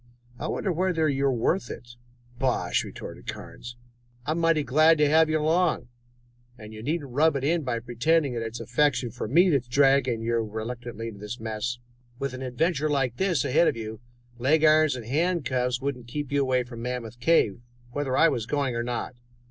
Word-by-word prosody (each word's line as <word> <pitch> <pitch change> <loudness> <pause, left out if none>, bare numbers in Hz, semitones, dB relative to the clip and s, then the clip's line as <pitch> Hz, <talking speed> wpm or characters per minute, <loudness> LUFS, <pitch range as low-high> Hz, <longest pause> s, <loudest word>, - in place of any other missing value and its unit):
I - - -3
wonder 195 - -1
whether 170 -2 +1
you 140 -1 +1
are - - +3
worth 130 +10 0
it?" 120 0 -9 0.4
"Bosh!" 130 -1 +1
retorted - - -9
Carnes. 120 0 -8 0.5
"I'm 155 +4 -1
mighty 165 -2 +3
glad 155 +4 +4
to 150 -1 +4
have 160 +2 +4
you 155 - +2
along, 160 -2 +1 0.7
but 105 -1 -11
you 110 0 -9
needn't 145 +1 -3
rub 150 +4 +3
it 135 - -2
in 165 +4 +2
by 125 -5 -2
pretending 135 +5 +1
that 115 - -3
it 115 0 -4
is - - -5
affection 145 -5 +1
for 120 - -5
me 175 - +4
that 140 -4 +3
is - - -26
dragging 130 -3 +3
you 115 +1 0
reluctantly 115 +1 -5
into 100 -3 -11
this 105 +3 -6
mess. 110 +2 -3 0.4
With 140 0 -3
an 130 - -7
adventure 150 +4 0
like 135 -4 0
this 180 -8 +1
ahead 170 +6 +3
of - - 0
you, 110 -1 -6 0.4
leg 150 +6 +3
irons 155 -2 +5
and 120 -3 -7
handcuffs 130 -4 0
wouldn't 130 -3 -4
keep 145 +3 -5
you 140 0 +2
away 130 -2 +1
from 120 -1 -9
Mammoth 120 -1 -5
Cave, 120 -6 +2 0.3
whether 135 -1 -1
I 165 - +6
was 115 -8 -1
going 140 -3 -1
or 115 - -1
not." 120 +1 -3
130 Hz, 195 wpm, -26 LUFS, 120-155 Hz, 0.7 s, I